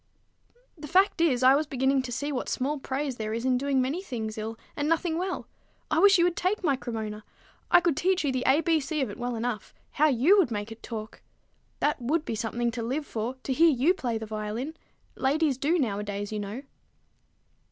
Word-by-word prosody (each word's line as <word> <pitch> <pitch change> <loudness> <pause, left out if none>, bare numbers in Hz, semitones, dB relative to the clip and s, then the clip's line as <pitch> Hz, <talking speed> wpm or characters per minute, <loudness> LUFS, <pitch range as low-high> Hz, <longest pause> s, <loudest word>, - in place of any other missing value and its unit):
"The 300 -3 -9
fact 370 +2 +3
is, 260 -7 +3
I 260 +1 +8
was 295 +2 +1
beginning 265 -1 +1
to 255 - -6
see 285 +5 -2
what 260 - -3
small 285 +3 -1
praise 270 -1 -3
there 220 0 -3
is 230 +2 -3
in 260 -1 +3
doing 275 +1 +1
many 270 +8 0
things 225 - -5
ill 220 +1 -5 0.2
and 290 +1 -1
nothing 330 0 +1
well. 370 0 -3 0.4
I 310 - +3
wish 395 +1 +7
you 340 - +4
would 350 -1 +2
take 375 +3 -1
my 285 -5 +3
Cremona. 220 -4 -5 0.5
I - - +7
could 335 -4 +1
teach 370 +2 +1
you 285 - +1
the 255 -1 -1
A 275 +4 +5
B 330 0 +2
C 300 +1 -2
of 250 -6 -1
it - - -10
well 245 0 -2
enough. 230 -1 -4 0.2
How 305 - +3
you 300 - +5
would 350 - +3
make 210 -1 -4
it 225 - -10
talk! 215 -2 -7 0.6
That 295 -3 +1
would 300 +6 0
be - - -3
something 235 +2 -1
to 235 0 -4
live 265 +6 -2
for, 230 +2 -3
to 265 - -1
hear 330 +5 +5
you 290 +5 +3
play 245 -11 -2
the 220 - -5
violin! 215 +7 -4 0.4
Ladies 280 0 +1
do, 310 +6 +2
nowadays, 205 -5 -2
you 215 - -2
know." 205 +6 -5
265 Hz, 215 wpm, -27 LUFS, 230-310 Hz, 0.6 s, I